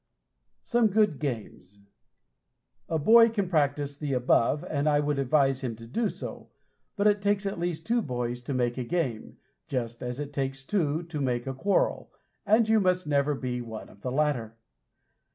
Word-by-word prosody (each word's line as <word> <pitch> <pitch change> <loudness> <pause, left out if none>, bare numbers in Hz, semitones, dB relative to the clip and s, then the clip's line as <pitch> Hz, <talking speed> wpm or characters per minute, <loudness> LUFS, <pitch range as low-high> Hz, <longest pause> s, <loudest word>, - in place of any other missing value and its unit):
SOME 235 -2 +3
GOOD 210 -7 +2
GAMES 105 -7 -6 1.1
A 160 - +1
boy 230 +9 +7
can 205 -4 -1
practice 145 -3 0
the 145 -1 -3
above, 125 +3 +2
and 150 0 0
I 145 -1 +3
would 145 -1 0
advise 135 0 +2
him 125 -4 -3
to 115 +1 -12
do 210 - -1
so, - - -8 0.5
but 200 - 0
it 205 -1 +4
takes 205 0 +1
at 195 -3 -3
least 170 -2 -3
two 235 +1 +2
boys 125 - -3
to 140 - -3
make 120 0 0
a - - -1
game 130 -6 -3 0.3
just 120 -3 -3
as 125 +1 -4
it 145 -1 -5
takes 135 -1 -3
two 165 -4 0
to 165 -3 -5
make 125 -3 -1
a 135 - -3
quarrel, 195 +10 0 0.4
and 220 +1 +4
you 220 0 +4
must 185 -2 +1
never 145 0 +1
be 125 -2 -3
one 110 -2 -8
of 100 - -18
the 125 - -3
latter. 130 -6 -1
145 Hz, 180 wpm, -28 LUFS, 125-180 Hz, 1.1 s, boy